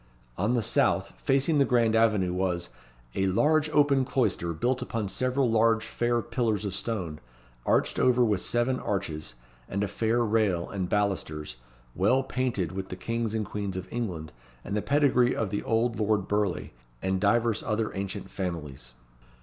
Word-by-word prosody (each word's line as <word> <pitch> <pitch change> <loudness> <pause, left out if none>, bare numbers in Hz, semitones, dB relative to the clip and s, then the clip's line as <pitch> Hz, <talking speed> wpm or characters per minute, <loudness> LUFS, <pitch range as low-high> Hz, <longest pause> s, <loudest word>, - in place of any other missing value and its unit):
On 105 - +1
the 120 - +1
south, - - +1
facing 140 +3 +2
the - - +6
grand 120 -4 +2
avenue, 105 -5 +3
was 90 -2 -1 0.4
"a 95 - +1
large 155 +10 +3
open 145 -3 +3
cloister, 110 -10 0
built 125 +11 0
upon 115 -4 -3
several 130 +5 +1
large 115 0 +3
fair 120 -1 0
pillars 115 -3 -1
of 100 - -2
stone, 95 -8 -3 0.5
arched - - +2
over 125 -1 +4
with 105 -5 +1
seven 120 +2 +1
arches, 80 -10 -3 0.3
with 100 +1 -1
a - - 0
fair 115 +3 +1
rail, 105 -6 +1
and 95 -3 -3
balusters, 80 -10 -1 0.4
well 125 +8 +2
painted 125 -10 -1
with 95 0 -5
the - - -5
Kings 115 +3 -2
and 110 -1 -1
Queens 100 -2 -4
of 95 - -5
England, 90 -10 -4 0.3
and 100 - -4
the 105 - +1
pedigree 135 -3 +3
of 105 -4 -2
the 100 - -1
old 115 +1 0
Lord 105 -2 +1
Burleigh, 105 -3 -1 0.3
and 95 0 0
divers 115 +1 +2
other 110 0 -1
ancient 95 -1 -5
families." 75 -10 -5
105 Hz, 165 wpm, -28 LUFS, 95-120 Hz, 0.5 s, the